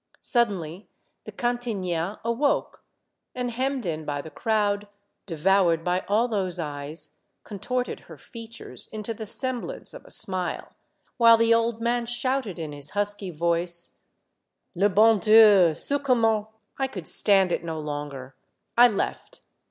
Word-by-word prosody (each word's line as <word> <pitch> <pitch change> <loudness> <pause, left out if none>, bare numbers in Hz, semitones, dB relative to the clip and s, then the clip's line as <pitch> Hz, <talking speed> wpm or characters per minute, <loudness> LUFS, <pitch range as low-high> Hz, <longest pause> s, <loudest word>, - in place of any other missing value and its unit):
Suddenly 195 - -1 0.4
the - - -8
cantiniere 210 -7 -2
awoke, 235 +5 -1 0.5
and 250 -1 -3
hemmed 260 0 -2
in 160 -2 -3
by 145 -1 -3
the 155 +2 -8
crowd, 205 +2 -1 0.4
devoured 170 0 +2
by 180 +1 0
all 215 +5 +2
those 190 -6 -1
eyes, 150 -1 -6 0.3
contorted 250 +5 -4
her - - -14
features 230 -1 -9
into 215 +1 -4
the 220 0 -8
sem 255 +2 -3
blance - - -8
of - - -11
a - - -17
smile, 185 -2 -3 0.4
while 230 -1 +7
the 230 0 +4
old 230 0 0
man 235 0 0
shouted 240 -3 -2
in 160 -3 -5
his 145 0 -5
husky 205 -1 -1
voice, 170 +1 -1 0.4
" - - -54
Le 200 +4 +3
bon 215 +2 +4
Dieu, 205 -5 +6
saoM 285 - -1
comme 250 -4 +2
tin 215 -1 +2
— 215 -1 -43
." - - -41
I 270 - +1
could 185 -10 -8
stand 195 -3 +6
it - - -1
no 160 -1 -4
longer. 145 -3 -6 0.4
I 240 +1 +8
left. 215 -4 -4
205 Hz, 155 wpm, -25 LUFS, 170-230 Hz, 0.5 s, I